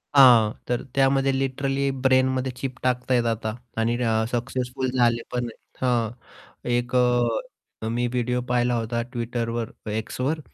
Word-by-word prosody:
हां, 120 Hz, -6 st, +8 dB, 0.2 s
तर 120 Hz, -1 st, 0 dB
त्यामध्ये 135 Hz, 0 st, +3 dB
लिटरली 135 Hz, +1 st, 0 dB
ब्रेनमध्ये 130 Hz, 0 st, +2 dB
चिप 130 Hz, -1 st, -4 dB
टाकता 125 Hz, 0 st, +1 dB
आहेत 120 Hz, -1 st, +3 dB
आता 110 Hz, -1 st, -1 dB, 0.3 s
आणि 115 Hz, +1 st, +1 dB
र 115 Hz, -2 st, +1 dB
सक्सेसफुल 125 Hz, +1 st, -2 dB
झाले 120 Hz, -2 st, +2 dB
पण 125 Hz, -1 st, -1 dB
आहे, 115 Hz, -, -8 dB, 0.3 s
हां, 120 Hz, -3 st, +1 dB, 0.6 s
एक 120 Hz, +1 st, 0 dB
अ, 120 Hz, -2 st, 0 dB
मी 120 Hz, +2 st, 0 dB
व्हिडिओ 125 Hz, 0 st, -1 dB
पाहिला 125 Hz, 0 st, +2 dB
होता 115 Hz, 0 st, -1 dB
Twitterवर 115 Hz, -1 st, -2 dB, 0.4 s
Xवर. 145 Hz, +5 st, -1 dB
125 Hz, 135 wpm, -24 LUFS, 120-130 Hz, 0.6 s, हां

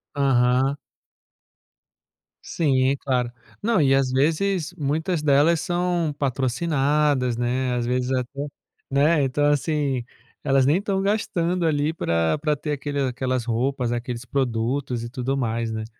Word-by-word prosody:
Aham. 130 Hz, 0 st, +2 dB, 1.7 s
Sim, 135 Hz, -5 st, +1 dB
é 140 Hz, -, 0 dB
claro. 125 Hz, -3 st, -1 dB, 0.3 s
Não, 220 Hz, -4 st, +2 dB
e, 135 Hz, -2 st, +4 dB
às 135 Hz, -2 st, +1 dB
vezes, 160 Hz, +6 st, +1 dB
muitas 160 Hz, +3 st, -1 dB
delas 150 Hz, +3 st, +3 dB
são 175 Hz, -3 st, 0 dB
patrocinadas, 135 Hz, -1 st, +1 dB
né, 125 Hz, +1 st, 0 dB
às 120 Hz, -1 st, -1 dB
vezes 125 Hz, +1 st, -1 dB
até 130 Hz, +2 st, -2 dB, 0.5 s
né, 145 Hz, +2 st, +3 dB
então, 135 Hz, +2 st, +1 dB
assim. 145 Hz, -3 st, 0 dB, 0.4 s
Elas 135 Hz, -2 st, +3 dB
nem 145 Hz, -, +4 dB
estão 195 Hz, -2 st, -1 dB
gastando 180 Hz, -4 st, 0 dB
ali 150 Hz, 0 st, +1 dB
pra 85 Hz, -, 0 dB
pra 150 Hz, 0 st, +1 dB
ter 150 Hz, +1 st, -3 dB
aquele 145 Hz, 0 st, -3 dB
aquelas 130 Hz, -2 st, -1 dB
roupas, 120 Hz, +1 st, -1 dB
aqueles 120 Hz, 0 st, -4 dB
produtos 125 Hz, 0 st, -1 dB
e 120 Hz, -, -6 dB
tudo 130 Hz, +2 st, -2 dB
mais, 115 Hz, -2 st, -1 dB
né. 110 Hz, 0 st, -4 dB
135 Hz, 135 wpm, -23 LUFS, 125-150 Hz, 1.7 s, e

